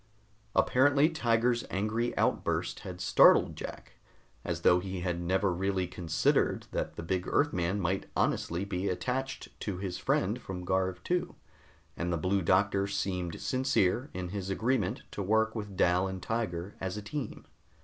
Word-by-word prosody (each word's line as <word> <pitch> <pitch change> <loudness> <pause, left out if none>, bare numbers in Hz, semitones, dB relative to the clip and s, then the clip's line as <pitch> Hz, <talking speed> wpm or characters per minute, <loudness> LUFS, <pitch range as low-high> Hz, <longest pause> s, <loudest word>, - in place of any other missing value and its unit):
Apparently 145 +4 +4
Tiger's 120 -5 +1
angry 110 +5 -1
outburst - - 0
had - - -8
startled - - +5
Jack, - - -9 0.4
as - - -3
though 90 - +5
he 95 -1 -5
had 90 -1 -2
never 95 +2 +1
really 95 +1 0
considered 85 -3 +1
that - - -3
the - - -6
big 90 +2 -1
Earthman 100 -9 +1
might 95 +1 -1
honestly 85 +4 0
be 100 -1 -2
attached 125 +9 -3
to 100 -4 -3
his 95 -1 -4
friend - - 0
from 90 -1 -6
Garv 95 0 0
II, 180 0 0 0.6
and 90 +1 -2
the 85 - +1
Blue 95 +4 +1
Doctor 100 +3 +2
seemed 90 -3 -2
sincere 130 -1 +1
in 90 -1 -5
his 100 0 -4
agreement 115 +8 0
to - - -4
work 110 +3 +2
with 105 -4 -6
Dal 90 +2 +3
and 95 0 -5
Tiger 100 -4 -3
as 95 +1 -3
a 105 - -5
team. 140 +5 -5
95 Hz, 155 wpm, -30 LUFS, 90-110 Hz, 0.6 s, startled